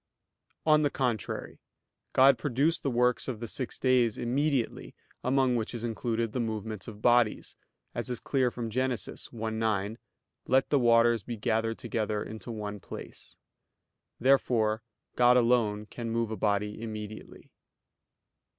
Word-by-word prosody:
On 155 Hz, -1 st, +5 dB
the 145 Hz, -, +2 dB
contrary, 120 Hz, -8 st, -3 dB, 0.5 s
God 135 Hz, 0 st, +6 dB
produced 145 Hz, +4 st, +1 dB
the 140 Hz, -, 0 dB
works 125 Hz, 0 st, +2 dB
of 125 Hz, -5 st, -4 dB
the 115 Hz, -, -5 dB
six 130 Hz, +2 st, -4 dB
days 125 Hz, -4 st, +3 dB
immediately 135 Hz, +1 st, -1 dB, 0.3 s
among 130 Hz, -1 st, +2 dB
which 115 Hz, +1 st, -2 dB
is 115 Hz, -, -5 dB
included 115 Hz, 0 st, -1 dB
the 125 Hz, -, -3 dB
movements 110 Hz, -3 st, -4 dB
of 105 Hz, -2 st, -10 dB
bodies, 120 Hz, -3 st, +3 dB, 0.4 s
as -, -, -4 dB
is 125 Hz, -, -2 dB
clear 130 Hz, -3 st, +1 dB
from 115 Hz, -2 st, -5 dB
Gen. 130 Hz, +3 st, +1 dB
1:9 110 Hz, -3 st, -2 dB, 0.5 s
"Let 130 Hz, +1 st, +3 dB
the 145 Hz, -, +4 dB
waters 115 Hz, -1 st, +4 dB
be 115 Hz, +4 st, -6 dB
gathered 115 Hz, 0 st, 0 dB
together 110 Hz, -4 st, -2 dB
into 110 Hz, +2 st, -8 dB
one 105 Hz, -2 st, -5 dB
place." -, -, -9 dB, 0.8 s
Therefore 115 Hz, -4 st, +3 dB, 0.3 s
God 125 Hz, 0 st, +6 dB
alone 115 Hz, -4 st, +2 dB
can 115 Hz, +2 st, -6 dB
move 115 Hz, -1 st, -1 dB
a -, -, -2 dB
body 105 Hz, +1 st, -1 dB
immediately. 110 Hz, -1 st, -8 dB
115 Hz, 140 wpm, -29 LUFS, 110-125 Hz, 0.8 s, God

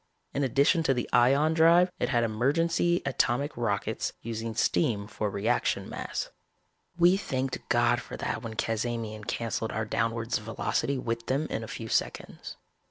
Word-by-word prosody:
In 140 Hz, -, 0 dB
addition 140 Hz, +6 st, +3 dB
to 135 Hz, -4 st, +2 dB
the 120 Hz, -, -2 dB
ion 140 Hz, +6 st, +4 dB
drive 170 Hz, +3 st, +5 dB
it -, -, 0 dB
had 120 Hz, -2 st, +2 dB
emergency 165 Hz, +10 st, +1 dB
atomic 140 Hz, +1 st, 0 dB
rockets, 110 Hz, -4 st, -1 dB
using 115 Hz, 0 st, -4 dB
steam 100 Hz, 0 st, +1 dB
for 105 Hz, 0 st, -3 dB
reaction 100 Hz, 0 st, 0 dB
mass. -, -, -4 dB, 0.7 s
We 175 Hz, +2 st, +5 dB
thanked 130 Hz, -8 st, -2 dB
God 120 Hz, 0 st, +3 dB
for -, -, -8 dB
that -, -, -3 dB
when 115 Hz, -2 st, -6 dB
Cazamian 115 Hz, -1 st, -3 dB
canceled 115 Hz, -1 st, -2 dB
our 110 Hz, +1 st, -2 dB
downwards 115 Hz, +1 st, -1 dB
velocity 115 Hz, +5 st, -1 dB
with 115 Hz, -2 st, -3 dB
them 140 Hz, +4 st, 0 dB
in 115 Hz, -, -2 dB
a -, -, -7 dB
few 115 Hz, -, -6 dB
seconds. -, -, -3 dB
120 Hz, 155 wpm, -28 LUFS, 115-140 Hz, 0.7 s, drive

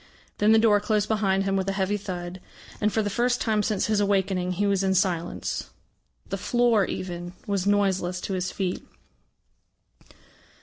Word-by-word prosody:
Then 210 Hz, +1 st, +4 dB
the 220 Hz, -, +7 dB
door 220 Hz, -2 st, +5 dB
closed 210 Hz, 0 st, 0 dB
behind 195 Hz, -3 st, +1 dB
him 195 Hz, 0 st, 0 dB
with 190 Hz, 0 st, 0 dB
a -, -, 0 dB
heavy 195 Hz, +1 st, 0 dB
thud, 180 Hz, -2 st, -6 dB, 0.4 s
and 210 Hz, 0 st, +2 dB
for 220 Hz, -, +1 dB
the 205 Hz, -, -1 dB
first 245 Hz, +3 st, +1 dB
time 215 Hz, -2 st, +1 dB
since 205 Hz, -1 st, 0 dB
his 215 Hz, -1 st, +1 dB
awakening 190 Hz, -2 st, +1 dB
he 200 Hz, +3 st, 0 dB
was 200 Hz, -1 st, +2 dB
in 190 Hz, 0 st, +2 dB
silence. 180 Hz, -3 st, -1 dB, 0.6 s
The -, -, -2 dB
floor, 240 Hz, -5 st, +3 dB
even, 175 Hz, -1 st, -5 dB
was 200 Hz, -2 st, -1 dB
noiseless 190 Hz, -3 st, +1 dB
to 195 Hz, -, -4 dB
his 185 Hz, -1 st, -2 dB
feet. 185 Hz, -2 st, -3 dB
195 Hz, 170 wpm, -26 LUFS, 185-210 Hz, 0.6 s, the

